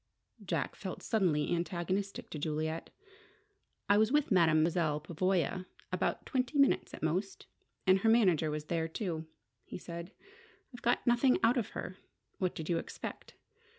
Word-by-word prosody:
Jack -, -, -2 dB
felt -, -, -6 dB
suddenly 175 Hz, -9 st, +1 dB
antagonistic 180 Hz, +3 st, -2 dB
to 155 Hz, -, -5 dB
Juliet. 155 Hz, +2 st, -2 dB, 1.0 s
"I 205 Hz, +1 st, +5 dB
was 220 Hz, +2 st, +3 dB
with 295 Hz, -3 st, +2 dB
Mademoiselle 160 Hz, -3 st, +3 dB
Pavoya 185 Hz, +3 st, 0 dB, 0.3 s
about -, -, -1 dB
twenty 255 Hz, +1 st, -1 dB
minutes 275 Hz, -1 st, +3 dB
at -, -, -11 dB
most, 185 Hz, +5 st, -1 dB, 0.4 s
and 190 Hz, 0 st, +5 dB
her 225 Hz, -, +3 dB
manager 185 Hz, -9 st, +4 dB
was 150 Hz, 0 st, -3 dB
there, 165 Hz, 0 st, -1 dB
too," 165 Hz, -2 st, -4 dB, 0.4 s
he -, -, -7 dB
said. 170 Hz, +1 st, -7 dB, 0.6 s
"I 245 Hz, -, -11 dB
got 240 Hz, -, +1 dB
nothing 240 Hz, +2 st, +4 dB
out 230 Hz, +2 st, +5 dB
of 235 Hz, -6 st, -1 dB
her. 185 Hz, -, -5 dB, 0.4 s
What 185 Hz, -2 st, 0 dB
did 160 Hz, -, -5 dB
you 170 Hz, -1 st, +1 dB
expect? -, -, -8 dB
180 Hz, 150 wpm, -32 LUFS, 160-215 Hz, 1.0 s, I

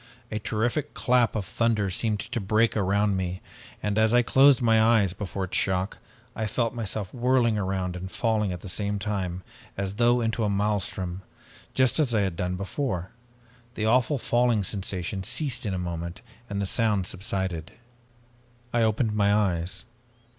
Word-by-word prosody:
"A 110 Hz, -, -2 dB
terrific 120 Hz, +7 st, -1 dB
clap 125 Hz, -3 st, +2 dB
of 105 Hz, -3 st, -2 dB
thunder 105 Hz, +1 st, 0 dB
seemed 105 Hz, +2 st, 0 dB
to -, -, -4 dB
break 110 Hz, +3 st, +2 dB
around 100 Hz, 0 st, +2 dB
me, 90 Hz, 0 st, -2 dB, 0.4 s
and 105 Hz, +1 st, 0 dB
as 110 Hz, +2 st, +4 dB
I 120 Hz, -, +5 dB
closed 135 Hz, +2 st, +6 dB
my 115 Hz, -3 st, +4 dB
eyes 110 Hz, -5 st, +4 dB
before 95 Hz, -1 st, -4 dB
its 95 Hz, -, -4 dB
shock, 95 Hz, 0 st, 0 dB, 0.4 s
I 110 Hz, 0 st, -2 dB
felt 115 Hz, +2 st, -1 dB
myself 105 Hz, -4 st, -4 dB
whirling 125 Hz, -2 st, +2 dB
around 95 Hz, -3 st, -2 dB
and 90 Hz, +1 st, -6 dB
falling 110 Hz, -2 st, 0 dB
at 90 Hz, -1 st, -5 dB
the -, -, -9 dB
same 100 Hz, +2 st, -1 dB
time 95 Hz, -3 st, -3 dB, 0.3 s
as 100 Hz, +1 st, -3 dB
though 120 Hz, +1 st, +4 dB
into 115 Hz, 0 st, 0 dB
a 105 Hz, -, +1 dB
maelstrom, 100 Hz, -3 st, -1 dB, 0.5 s
just 130 Hz, +3 st, +3 dB
as 130 Hz, -7 st, +2 dB
I 105 Hz, -, +3 dB
had 95 Hz, -4 st, -1 dB
done 90 Hz, +1 st, -2 dB
before. 95 Hz, -, -3 dB, 0.6 s
The 110 Hz, -, -1 dB
awful 125 Hz, +5 st, +3 dB
falling 120 Hz, -3 st, +2 dB
sensation 95 Hz, -1 st, -3 dB
ceased 125 Hz, +1 st, 0 dB
in 100 Hz, -, -1 dB
a -, -, -2 dB
moment 85 Hz, 0 st, -5 dB, 0.3 s
and 100 Hz, 0 st, -3 dB
the 100 Hz, -, 0 dB
sound 105 Hz, -2 st, +2 dB
subsided. 95 Hz, -3 st, -3 dB, 1.0 s
I 120 Hz, -, +2 dB
opened 110 Hz, 0 st, +1 dB
my 100 Hz, -1 st, +3 dB
eyes. 95 Hz, -4 st, 0 dB
105 Hz, 170 wpm, -26 LUFS, 95-115 Hz, 1.0 s, closed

